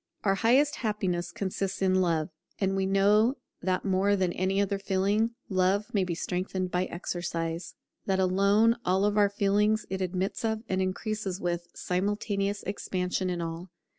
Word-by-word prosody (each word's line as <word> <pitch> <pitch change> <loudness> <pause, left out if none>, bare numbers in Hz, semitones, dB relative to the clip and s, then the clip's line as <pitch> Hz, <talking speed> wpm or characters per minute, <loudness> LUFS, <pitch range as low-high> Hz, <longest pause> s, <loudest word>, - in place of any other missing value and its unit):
Our 195 - +3
highest 260 +9 +3
happiness 190 -6 -1
consists 195 0 -3
in 190 -1 +2
Love; 165 -2 +1 0.3
and 195 -1 0
we 190 0 0
know 205 +6 +4 0.3
that 185 +1 -1
more 195 +1 +2
than 185 -3 0
any 190 +2 0
other 200 0 0
feeling 200 +4 +1
love 190 +2 +1
may 200 -3 +2
be 175 -2 -2
strengthened 185 +1 -2
by 180 +1 +1
exercise; 170 -1 -4 0.3
that 190 -1 +1
alone 200 +5 +4
of 195 +3 +2
all 205 -1 +4
feelings 205 +2 +2
it 190 0 -2
admits 185 +3 -2
of, 220 -1 -1
and 190 0 0
increases 190 0 -2
with, 175 -1 -2
simultaneous 200 +2 -1
expansion 185 -1 -2
in 175 -1 -2
all. 165 +2 -5
195 Hz, 155 wpm, -28 LUFS, 185-205 Hz, 0.3 s, know